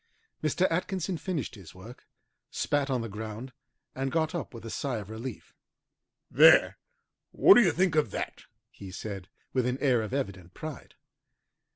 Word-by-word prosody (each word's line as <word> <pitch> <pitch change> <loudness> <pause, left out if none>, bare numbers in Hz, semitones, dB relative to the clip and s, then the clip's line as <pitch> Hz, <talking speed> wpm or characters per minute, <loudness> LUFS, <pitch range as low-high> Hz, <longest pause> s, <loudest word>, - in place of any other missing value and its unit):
Mr. 155 +4 +1
Atkinson 185 +1 -1
finished 165 - -3
his 95 -7 -13
work, 110 +7 -13 0.4
spat 145 -1 0
on 130 -3 0
the 115 - -4
ground, 110 +4 -7 0.4
and 135 0 -2
got 160 -1 0
up 170 -4 -4
with 115 -2 -10
a 115 - -6
sigh 130 -1 -2
of 105 0 -7
relief. 115 +1 -7 0.8
"There! - - +6 0.5
what - - +7
do 230 - +7
you 185 -7 +4
think 180 +2 +1
of 155 -7 +2
that?" - - -5 0.3
he 95 - -10
said, 95 0 -6 0.3
with 125 -2 +1
an 125 +1 -1
air 130 -5 +2
of 110 - -5
evident 100 -10 -4
pride. 155 -3 -8
130 Hz, 165 wpm, -29 LUFS, 110-155 Hz, 0.8 s, what